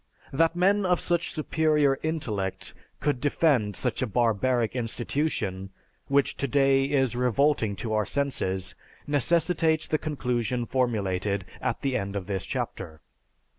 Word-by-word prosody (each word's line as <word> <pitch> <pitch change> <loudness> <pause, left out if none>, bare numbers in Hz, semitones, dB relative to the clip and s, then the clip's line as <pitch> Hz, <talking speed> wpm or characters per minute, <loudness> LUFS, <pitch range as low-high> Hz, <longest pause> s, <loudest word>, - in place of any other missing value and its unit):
That 165 +4 +2
men 200 +3 +3
of 180 -2 +2
such 175 0 0
superior 150 -3 +2
intellect 110 - -3 0.3
could 145 -4 0
defend 140 - +2
such - - -2
a - - +1
barbaric 120 +1 +1
institution, 115 -5 -2 0.4
which 140 0 +2
today 135 0 +2
is 135 -3 +1
revolting 125 -3 +2
to 110 +2 -4
our 105 -1 +1
senses, 95 -10 -1 0.3
necessitates 160 +2 +2
the 155 - 0
conclusion 125 -5 -1
formulated 100 -6 -1 0.2
at - - -2
the 135 -2 0
end 100 -2 -2
of 100 -2 -3
this 95 -2 -3
chapter. 80 -1 -5
130 Hz, 130 wpm, -27 LUFS, 105-150 Hz, 0.4 s, men